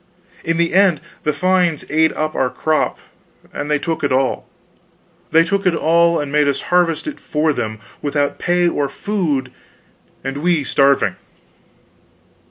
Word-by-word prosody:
In 165 Hz, 0 st, 0 dB
the 170 Hz, 0 st, +1 dB
end 190 Hz, -4 st, +4 dB, 0.2 s
the 150 Hz, -, 0 dB
fines 180 Hz, 0 st, +1 dB
ate 160 Hz, +1 st, +2 dB
up 155 Hz, 0 st, -2 dB
our 130 Hz, -, 0 dB
crop 155 Hz, +5 st, 0 dB, 0.6 s
and 145 Hz, -, -4 dB
they 150 Hz, -, +2 dB
took 160 Hz, +1 st, -3 dB
it 140 Hz, -, +1 dB
all; 130 Hz, 0 st, 0 dB, 0.8 s
they 165 Hz, +1 st, +5 dB
took 195 Hz, +2 st, -1 dB
it 175 Hz, -, +2 dB
all 170 Hz, +1 st, +3 dB
and 145 Hz, -1 st, -4 dB
made 150 Hz, 0 st, +3 dB
us 140 Hz, -, 0 dB
harvest 175 Hz, -3 st, +2 dB
it 305 Hz, -2 st, -6 dB
for 155 Hz, 0 st, 0 dB
them, 110 Hz, -4 st, -3 dB, 0.2 s
without 145 Hz, -1 st, -1 dB
pay 175 Hz, 0 st, +2 dB
or 145 Hz, -4 st, 0 dB
food, 150 Hz, -7 st, -2 dB, 0.7 s
and 135 Hz, +1 st, -4 dB
we 165 Hz, 0 st, +1 dB
starving. 140 Hz, 0 st, +2 dB
155 Hz, 155 wpm, -18 LUFS, 145-170 Hz, 0.8 s, they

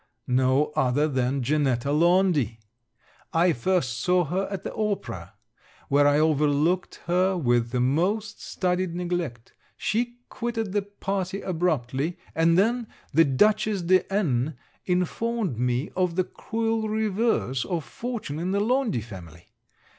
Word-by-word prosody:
No 130 Hz, +3 st, +2 dB
other 135 Hz, +4 st, +2 dB
than 130 Hz, -1 st, 0 dB
Janetta 140 Hz, -1 st, +1 dB
Laundy! 165 Hz, -, +3 dB, 0.8 s
I 170 Hz, +1 st, +4 dB
first 125 Hz, -4 st, 0 dB
saw 180 Hz, +7 st, +3 dB
her 185 Hz, +6 st, -1 dB
at 195 Hz, -1 st, -5 dB
the -, -, -5 dB
opera, 120 Hz, -, -3 dB, 0.5 s
where 145 Hz, +1 st, +4 dB
I 145 Hz, 0 st, +4 dB
overlooked 155 Hz, +3 st, +1 dB
her 185 Hz, +2 st, +2 dB
with 120 Hz, -6 st, +1 dB
the 125 Hz, +1 st, -1 dB
most 190 Hz, -, 0 dB
studied 180 Hz, -1 st, -1 dB
neglect. 175 Hz, -9 st, -3 dB, 0.2 s
She 240 Hz, +3 st, -1 dB
quitted 230 Hz, -4 st, -3 dB
the 205 Hz, +1 st, +1 dB
party 195 Hz, -1 st, -3 dB
abruptly; 160 Hz, -3 st, -1 dB, 0.2 s
and 165 Hz, +1 st, +3 dB
then 230 Hz, +4 st, +2 dB, 0.3 s
the 165 Hz, +3 st, +6 dB
Dutchess 210 Hz, +7 st, +2 dB
de 185 Hz, +3 st, +2 dB
N 150 Hz, -, 0 dB, 0.3 s
informed 185 Hz, -, -1 dB
me 125 Hz, +4 st, 0 dB
of 180 Hz, -2 st, 0 dB
the 185 Hz, -, +2 dB
cruel 225 Hz, +2 st, -2 dB
reverse 215 Hz, -, 0 dB
of 175 Hz, -5 st, -2 dB
fortune 230 Hz, -, -5 dB
in 175 Hz, +2 st, -2 dB
the 200 Hz, -, +2 dB
Laundy 235 Hz, -, +1 dB
family. 90 Hz, -7 st, -11 dB
175 Hz, 130 wpm, -26 LUFS, 135-200 Hz, 0.8 s, the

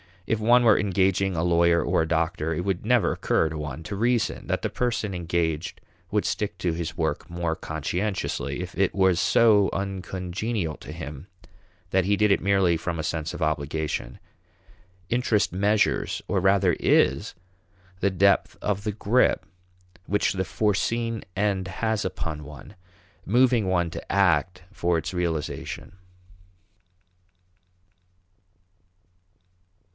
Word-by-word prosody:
If 110 Hz, -, 0 dB
one 120 Hz, +3 st, +5 dB
were 110 Hz, -3 st, +5 dB
engaging 95 Hz, -1 st, +1 dB
a 80 Hz, -, 0 dB
lawyer 85 Hz, 0 st, +3 dB
or -, -, +1 dB
a -, -, -3 dB
doctor, 80 Hz, 0 st, 0 dB
it 85 Hz, -, -2 dB
would 95 Hz, +1 st, -2 dB
never 120 Hz, -6 st, +3 dB
occur 80 Hz, -, +1 dB
to 80 Hz, -, -6 dB
one 75 Hz, +1 st, -6 dB
to 100 Hz, +6 st, -5 dB
reason 120 Hz, +1 st, 0 dB
that -, -, -1 dB
the -, -, 0 dB
person 115 Hz, -5 st, -1 dB
engaged 85 Hz, -2 st, -2 dB, 0.3 s
would 105 Hz, 0 st, 0 dB
stick 105 Hz, -, -2 dB
to 90 Hz, -, 0 dB
his 85 Hz, +1 st, -4 dB
work 80 Hz, -2 st, -2 dB
more 85 Hz, -1 st, -2 dB
conscientiously 80 Hz, -2 st, -3 dB
if 90 Hz, 0 st, -7 dB
it 95 Hz, -1 st, +1 dB
was 95 Hz, -2 st, +3 dB
so 105 Hz, -3 st, +4 dB
uncongenial 95 Hz, -1 st, -3 dB
to -, -, -10 dB
him 75 Hz, +4 st, -8 dB, 0.6 s
that 95 Hz, -1 st, +2 dB
he 100 Hz, +1 st, +3 dB
did 105 Hz, 0 st, +3 dB
it -, -, +3 dB
merely 95 Hz, -4 st, +3 dB
from 85 Hz, +1 st, -3 dB
a 80 Hz, -, -3 dB
sense 80 Hz, -1 st, -3 dB
of 90 Hz, -, -7 dB
obligation. 75 Hz, -4 st, -2 dB, 0.9 s
Interest 120 Hz, -3 st, +1 dB
measures 100 Hz, +3 st, +1 dB
or 100 Hz, -, +1 dB
rather 95 Hz, -2 st, +3 dB
is -, -, +2 dB, 0.6 s
the 100 Hz, -, +2 dB
depth 100 Hz, +1 st, +2 dB
of 100 Hz, -1 st, -2 dB
the 105 Hz, -, -1 dB
grip 110 Hz, +4 st, +2 dB, 0.6 s
which 105 Hz, -1 st, +1 dB
the 95 Hz, -1 st, -2 dB
foreseen 115 Hz, +3 st, -1 dB
end 100 Hz, -2 st, 0 dB
has 110 Hz, -2 st, -1 dB
upon 80 Hz, -4 st, -4 dB
one, 75 Hz, +5 st, -11 dB, 0.5 s
moving 120 Hz, -1 st, +3 dB
one 90 Hz, -2 st, +1 dB
to -, -, -7 dB
act 90 Hz, -1 st, +2 dB
for 85 Hz, -4 st, 0 dB
its 80 Hz, +2 st, -4 dB
realization. 85 Hz, -4 st, -3 dB
95 Hz, 140 wpm, -25 LUFS, 85-105 Hz, 0.9 s, one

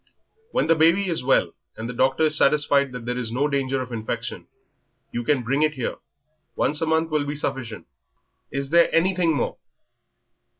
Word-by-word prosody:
"When -, -, 0 dB
the 165 Hz, -, +4 dB
baby 170 Hz, +5 st, +3 dB
is 165 Hz, -, -2 dB
well, 125 Hz, -10 st, +2 dB, 0.3 s
and 110 Hz, -, -5 dB
the 125 Hz, -, -5 dB
doctor 130 Hz, +5 st, +2 dB
is 155 Hz, -1 st, +3 dB
satisfied 140 Hz, -2 st, +3 dB
there 125 Hz, 0 st, -4 dB
is 115 Hz, -3 st, -3 dB
no 135 Hz, +5 st, +1 dB
danger 135 Hz, -2 st, -1 dB
of 125 Hz, -, -11 dB
infection, 110 Hz, -2 st, -5 dB, 0.6 s
you 120 Hz, -, -3 dB
can 130 Hz, +1 st, +1 dB
bring 135 Hz, +5 st, 0 dB
it 155 Hz, 0 st, +2 dB
here 125 Hz, -4 st, -3 dB, 0.6 s
once 150 Hz, -, +1 dB
a 165 Hz, -, 0 dB
month 160 Hz, 0 st, +1 dB
will 150 Hz, -1 st, +1 dB
be 145 Hz, -, -3 dB
sufficient. 135 Hz, -6 st, -4 dB, 0.7 s
Is 140 Hz, 0 st, -3 dB
there 170 Hz, 0 st, +5 dB
anything 175 Hz, -1 st, +2 dB
more?" -, -, -2 dB
140 Hz, 175 wpm, -23 LUFS, 125-160 Hz, 0.7 s, there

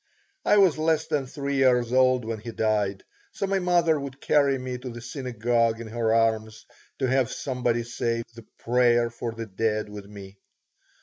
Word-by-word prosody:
I 210 Hz, -, +4 dB
was 185 Hz, -6 st, +4 dB
less 160 Hz, 0 st, +1 dB
than 140 Hz, -3 st, -1 dB
three 140 Hz, +1 st, -3 dB
years 125 Hz, -2 st, +3 dB
old 130 Hz, -2 st, +3 dB
when 115 Hz, -1 st, -4 dB
he 110 Hz, -, -8 dB
died, 105 Hz, -3 st, -1 dB, 0.3 s
so -, -, -2 dB
my 195 Hz, 0 st, 0 dB
mother 175 Hz, -4 st, +2 dB
would 140 Hz, -1 st, -7 dB
carry 140 Hz, -2 st, +2 dB
me 125 Hz, -1 st, -5 dB
to 125 Hz, +1 st, -7 dB
the 120 Hz, 0 st, -8 dB
synagogue 120 Hz, -2 st, -1 dB
in 115 Hz, -, -6 dB
her 115 Hz, 0 st, 0 dB
arms 110 Hz, -1 st, 0 dB, 0.3 s
to 135 Hz, -, 0 dB
have 130 Hz, 0 st, +1 dB
somebody 125 Hz, -3 st, -1 dB
say 115 Hz, 0 st, -2 dB
the 115 Hz, -1 st, -13 dB
Prayer 120 Hz, -1 st, +2 dB
for 115 Hz, 0 st, -5 dB
the 115 Hz, 0 st, -6 dB
Dead 110 Hz, +1 st, -1 dB
with 105 Hz, -1 st, -9 dB
me. 100 Hz, -1 st, -12 dB
120 Hz, 180 wpm, -26 LUFS, 115-135 Hz, 0.3 s, I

